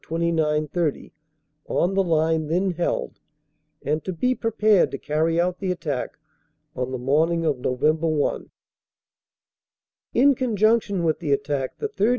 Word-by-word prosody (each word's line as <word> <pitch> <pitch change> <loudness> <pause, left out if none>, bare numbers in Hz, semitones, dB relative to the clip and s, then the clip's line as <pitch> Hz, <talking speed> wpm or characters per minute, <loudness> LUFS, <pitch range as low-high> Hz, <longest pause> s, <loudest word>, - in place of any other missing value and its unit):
29 160 -2 0
30 160 -1 -2 0.5
on 180 +3 +1
the 195 - +3
line 160 -3 +1
then 180 +4 +1
held, 175 0 -2 0.7
and 150 +3 -1
to 185 - -3
be 250 +9 0
prepared 215 -4 +2
to 135 - -5
carry 160 +4 0
out 180 +1 0
the 190 - -2
attack 150 -7 -4 0.6
on 125 -2 -3
the 130 - -2
morning 160 +6 +1
of 145 -5 0
Nov. 125 0 -3
1. 155 -1 +1 1.7
"In 280 +3 +5
conjunction 220 -5 +1
with 160 -2 +1
the 145 - -3
attack 140 -1 -1
the 435 - -2
3rd. 240 - 0
165 Hz, 145 wpm, -23 LUFS, 150-190 Hz, 1.7 s, In